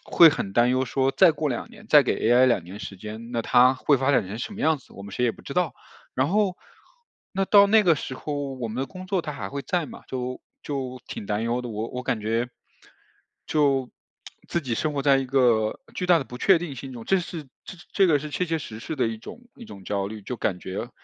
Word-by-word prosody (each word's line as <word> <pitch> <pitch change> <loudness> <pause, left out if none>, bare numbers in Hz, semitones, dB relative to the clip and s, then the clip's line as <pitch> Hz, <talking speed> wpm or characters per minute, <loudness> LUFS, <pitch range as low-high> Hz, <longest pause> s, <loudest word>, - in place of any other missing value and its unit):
会 165 -2 +7
很 100 -8 -4
担 120 +1 +4
忧 130 +1 +1
说， 135 +2 +1
再 135 - +7
过 150 -1 -2
2 120 - -4
年 215 -2 -15
再 150 -1 +8
给 125 - 0
AI 120 +2 +6
2 120 -9 +2
年 95 +4 -9
时 100 - -7
间， 110 +4 -8
那 120 -1 -1
它 125 +2 +5
会 140 +1 +2
发 135 +2 +2
展 125 - +2
成 100 +4 -6
什 210 - -5
么 210 - -8
样 160 -1 +3
子， 130 - -20
我 100 - -9
们 100 0 -10
谁 125 - 0
也 - - +3
不 - - -16
知 - - -7
道。 165 -5 0 0.4
然 130 +2 +1
后 200 -2 +2 0.8
那 195 0 0
到 200 +1 +7
那 215 +2 +5
个 175 -5 +5
时 135 - -5
候 145 0 -4
我 125 -2 -4
们 110 - -6
的 - - -3
工 185 +3 -10
作 190 -1 0
它 150 - -5
还 100 -7 -6
会 140 - -4
在 180 0 -1
嘛， - - -11
就 125 0 -4 0.2
就 130 -3 -5
挺 105 - -7
担 105 +1 -1
忧 120 +1 0
的。 125 - -5
我 110 0 -4
我 125 - -5
感 120 -3 -1
觉， 115 +3 0 1.0
就 135 -4 +1 0.6
自 170 - 0
己 130 -7 -3
生 155 +6 -1
活 145 - -1
在 140 -1 +5
一 135 - 0
个 120 -5 +2
巨 180 - -3
大 175 -2 +6
的 140 - -4
不 125 - -9
确 190 +6 +5
定 165 -4 -5
性 130 +2 -8
中， 120 -2 -8
这 195 - +3
是 165 -4 -6 0.5
这 195 - +5
个 155 -4 +4
是 150 +2 -6
切 180 - -1
切 165 -1 -1
实 110 -7 -8
实 160 - -5
的 125 -4 +1
一 115 - -4
种 115 - -10 0.2
一 240 - -10
种 100 - -12
焦 100 0 -1
虑。 110 +1 -7
就 125 - -5
感 95 -5 -1
觉 105 +6 -5
130 Hz, 270 characters per minute, -25 LUFS, 115-160 Hz, 1.0 s, 再